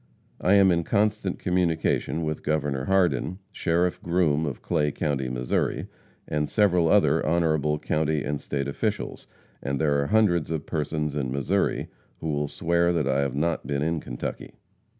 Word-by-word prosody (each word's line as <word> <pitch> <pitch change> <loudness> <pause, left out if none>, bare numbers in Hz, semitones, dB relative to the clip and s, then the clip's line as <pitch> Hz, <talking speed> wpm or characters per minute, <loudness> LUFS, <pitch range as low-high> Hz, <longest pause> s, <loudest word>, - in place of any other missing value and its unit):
I 90 - +3
am 100 -2 +6
in 85 -1 +1
constant 105 0 0
communication 85 -2 0
with 75 -1 -3
Governor 75 -3 -1
Hardin, 90 -3 +1
Sheriff 85 +1 0
Groom, 80 -3 +1
of 70 - -6
Clay 75 -4 +1
county, 70 -4 -2
Mo., 60 0 -4 0.8
and 75 0 -1
several 90 -6 +3
other - - +4
honorable 80 -2 +1
county 75 0 0
and 75 -1 -3
state 70 -1 -3
officials, 70 - -3 0.3
and 70 0 -2
there 70 -1 +2
are 70 - -1
hundreds 100 -8 +2
of 80 -2 -3
persons 75 -1 -2
in 65 -3 -2
Missouri 70 0 0 0.3
who 80 - -4
will 75 -1 0
swear 85 +3 +1
that 80 -5 0
I 70 0 +2
have 70 -2 -1
not 80 +3 -1
been 70 0 -1
in 80 +1 0
Kentucky. - - -6
80 Hz, 160 wpm, -26 LUFS, 70-85 Hz, 0.8 s, am